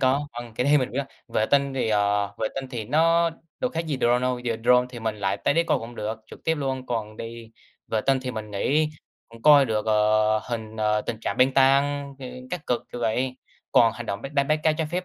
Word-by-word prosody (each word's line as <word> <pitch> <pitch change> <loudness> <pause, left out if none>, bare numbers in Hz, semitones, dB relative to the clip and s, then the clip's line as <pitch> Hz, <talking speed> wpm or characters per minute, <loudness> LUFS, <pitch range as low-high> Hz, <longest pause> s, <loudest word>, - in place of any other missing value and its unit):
có 135 +2 +2
vâng, 120 -1 -8
cái 125 - -1
đấy 145 +1 +5
mình 130 -1 -1
biết. 140 +2 -1 0.2
Vệ 110 - +1
tinh 140 -1 +2
thì, 125 -4 0
ờ, 100 -1 +1
vệ 110 - 0
tinh 135 -1 -4
thì 115 -3 -4
nó 165 +6 +3 0.3
đâu 255 - 0
khác 165 +1 -3
gì 150 -4 -1
drone 120 0 +3
đâu, 125 -1 0
giờ 120 -2 -2
drone 125 0 +5
thì 120 - -8
mình 110 -1 -2
lại 100 -1 -1
tới 120 - 0
đấy 170 +1 +3
coi - - +2
cũng 115 +1 -9
được 110 +1 -4
trực - - -13
tiếp 160 - +2
luôn, 135 -3 -3
còn 110 -3 -3
đi 115 0 -8 0.4
vệ 110 - 0
tinh 135 -1 +4
thì 130 - -3
mình 110 -3 -6
nghĩ 145 +10 +1 0.4
cũng 115 0 -15
coi 145 -2 +7
được, 110 -3 -1
ờ, 110 0 +3
hình, 110 -2 -6
ờ, 105 0 +1
tình 110 +1 -5
trạng - - -3
băng 130 +1 +4
tan, 140 +1 +3
ơ, 130 - -7 0.2
các 180 -4 -5
cực, 120 -1 0
kiểu 120 - -5
vậy. 125 +3 0 0.4
Còn 115 -1 +5
hành 120 -1 -8
động 100 +2 -4
bắt 135 - -7
đánh 140 -1 +1
bắt 155 0 +2
cá 155 - +4
trái 155 0 -2
phép 180 +2 -2
125 Hz, 250 wpm, -25 LUFS, 110-140 Hz, 0.4 s, coi